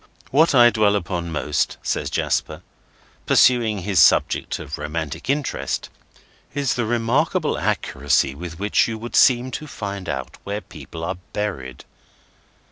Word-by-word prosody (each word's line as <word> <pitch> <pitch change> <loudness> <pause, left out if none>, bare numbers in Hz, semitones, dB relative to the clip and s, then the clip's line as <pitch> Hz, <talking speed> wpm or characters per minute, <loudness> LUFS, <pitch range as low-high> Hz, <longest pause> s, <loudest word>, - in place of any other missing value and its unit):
"What 150 +2 +4
I 120 -1 +7
dwell 105 -2 +3
upon 85 -3 -3
most," 75 -1 -1
says - - -1
Jasper, - - -1 0.6
pursuing 110 -6 +4
his 95 0 +1
subject - - +3
of - - -7
romantic 80 - -5
interest, 145 -1 -2 0.7
"is 140 -3 +1
the 120 -2 -1
remarkable 115 0 +1
accuracy 70 - 0
with 85 +3 -8
which 100 +2 +2
you 115 -1 -4
would 120 +2 -7
seem 125 -1 +4
to 155 - -5
find 100 - -6
out 65 -2 -5
where 100 +1 -3
people 80 -5 -10
are 90 +2 -3 0.2
buried. 90 -12 -4
105 Hz, 135 wpm, -22 LUFS, 85-120 Hz, 0.7 s, I